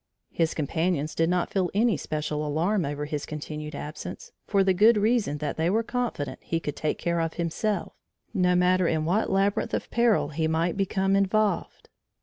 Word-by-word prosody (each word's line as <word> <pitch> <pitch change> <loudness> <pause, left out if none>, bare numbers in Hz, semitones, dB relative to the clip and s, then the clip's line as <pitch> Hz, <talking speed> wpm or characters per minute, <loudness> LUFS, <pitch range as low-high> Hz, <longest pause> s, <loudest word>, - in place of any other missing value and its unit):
His 165 -1 0
companions 160 0 -1
did 165 0 +1
not 180 -1 0
feel 185 -3 +1
any 225 0 +3
special 150 0 -3
alarm 165 +6 0
over 145 +1 -3
his 150 -1 -3
continued 150 0 -6
absence, 150 +2 -7 0.2
for 200 -2 +3
the 190 0 +3
good 215 +5 +5
reason 210 -7 +1
that 145 -1 -3
they 160 +2 +1
were 220 +4 +2
confident 235 - -3
he 165 - -2
could 150 -2 -4
take 155 - -1
care 170 0 -1
of 165 -1 -2
himself 175 +4 -2 0.4
no 180 -1 +3
matter 180 0 +3
in 155 -1 0
what 190 +7 +1
labyrinth 195 +1 +1
of - - -5
peril 235 -2 +3
he 160 +1 -1
might 165 +2 0
become 195 0 +1
involved. 200 -1 0
175 Hz, 180 wpm, -26 LUFS, 155-195 Hz, 0.4 s, good